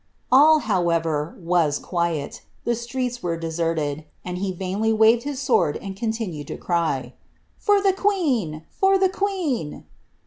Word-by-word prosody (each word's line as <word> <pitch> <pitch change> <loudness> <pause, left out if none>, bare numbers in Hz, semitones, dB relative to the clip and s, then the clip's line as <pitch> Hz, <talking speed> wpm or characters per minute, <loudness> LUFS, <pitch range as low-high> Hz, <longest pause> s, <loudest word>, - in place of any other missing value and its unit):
"'* - - -42
All, 300 +4 +7
however, 165 - 0
was 165 -4 +1
quiet; 170 -5 -2 0.2
the 235 - +1
streets 245 +1 -3
were 170 -1 -2
deserted, 160 -2 -2 0.2
and 180 0 -4
he 195 0 -1
vainly 190 +4 -1
waved 220 +2 +4
his 285 -2 -3
sword 255 - +2
and 195 -1 -7
continued 215 - -3
to - - -5
cry, 145 -8 -1
^ - - -39 0.4
For 410 -1 +4
the 390 -1 +4
queen! 275 - 0
for 390 0 +3
the 380 0 +3
queen 365 - -2
195 Hz, 150 wpm, -23 LUFS, 165-260 Hz, 0.4 s, All